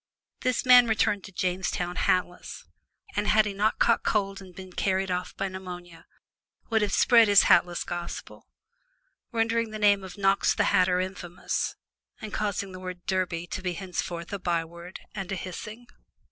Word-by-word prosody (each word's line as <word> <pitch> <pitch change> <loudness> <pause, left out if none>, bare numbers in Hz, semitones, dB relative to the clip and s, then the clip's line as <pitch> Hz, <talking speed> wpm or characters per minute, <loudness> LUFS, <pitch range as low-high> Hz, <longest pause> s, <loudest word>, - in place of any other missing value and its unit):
This 255 0 0
man 250 -1 +8
returned 205 -3 +1
to - - -11
Jamestown 180 -1 -2
hatless, 180 -1 -1 0.5
and 205 +1 0
had 215 0 +5
he 205 - -3
not 210 +2 +1
caught 230 - +3
cold 195 -2 0
and 185 -2 -13
been 185 -1 -10
carried 190 0 0
off 180 0 -3
by 195 - -1
pneumonia, 180 -2 -9 0.6
would 220 -1 +3
have 210 - 0
spread 230 -2 +5
his 205 -1 +7
hatless 175 0 +3
gospel, 175 0 -7 0.8
rendering 230 0 0
the 215 - -6
name 205 -2 +3
of 185 0 -9
Knox 195 0 +2
the - - +2
Hatter 180 0 +3
infamous, 185 -1 -3 0.4
and 215 -1 -8
causing 200 -2 -2
the 185 - -9
word 185 -1 -8
"Derby" 180 -3 -1
to 185 - -3
be 180 -1 -2
henceforth 175 -1 -5
a 200 - -3
byword 170 0 -4
and 195 -2 -5
a - - -1
hissing. 215 +6 -7
190 Hz, 165 wpm, -27 LUFS, 180-205 Hz, 0.8 s, man